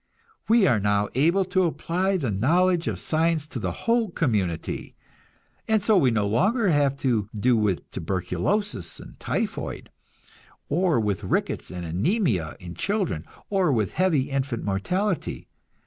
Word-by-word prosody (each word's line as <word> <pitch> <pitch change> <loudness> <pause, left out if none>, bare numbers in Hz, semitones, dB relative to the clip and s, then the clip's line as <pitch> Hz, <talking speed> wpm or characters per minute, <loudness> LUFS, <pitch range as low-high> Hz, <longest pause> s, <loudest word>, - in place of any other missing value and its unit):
We 225 -2 +5
are 120 - +3
now 105 0 +1
able 170 +9 +3
to 185 0 +2
apply 185 +3 0
the 135 -10 -2
knowledge 170 - +2
of - - -2
science 160 -1 +1
to 150 - -6
the - - -2
whole 230 -2 +2
community, 105 - -2 0.7
and 220 -3 +2
so 215 0 +4
we 145 -9 +5
no 110 -3 +1
longer 200 - +2
have 145 -3 +2
to 110 -6 +1
do 120 +4 +3
with 105 -5 0
tuberculosis 95 - -2
and - - -13
typhoid, - - -3 0.8
or 170 -1 +2
with 105 -4 -1
rickets - - -1
and 90 -1 -6
anæmia 95 - 0
in 85 -1 -9
children, 180 - -1 0.3
or 190 -6 +2
with 110 -6 0
heavy 160 -8 +1
infant 135 -3 -2
mortality. 180 - -2
140 Hz, 145 wpm, -25 LUFS, -, 0.8 s, We